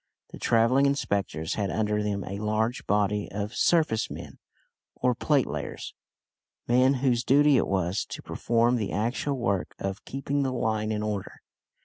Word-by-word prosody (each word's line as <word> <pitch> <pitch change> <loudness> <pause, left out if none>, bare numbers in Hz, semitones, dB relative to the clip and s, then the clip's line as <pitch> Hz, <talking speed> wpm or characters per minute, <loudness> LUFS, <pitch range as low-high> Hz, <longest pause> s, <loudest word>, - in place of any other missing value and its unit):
The - - -9
travelling 120 +4 +3
inspectors 100 - -1
had 100 -2 -1
under 105 0 0
them 100 -2 -2
a 100 +2 -5
large 110 +3 -1
body 105 0 +1
of 105 +2 -4
"surface 155 -10 +2
men" - - -9 0.6
or 125 0 +1
"plate 140 +2 +2
layers," - - -5 0.7
men 130 +3 +4
whose 120 -2 +2
duty 145 +2 +5
it 120 - +2
was 95 0 0
to - - -8
perform 120 +1 +1
the 105 -4 -2
actual 120 +6 -1
work 100 -7 -1
of 95 0 -4
keeping 140 +1 -2
the 135 -1 0
line 110 -3 -1
in 105 0 -2
order. 105 -2 -3
110 Hz, 155 wpm, -27 LUFS, 105-125 Hz, 0.7 s, duty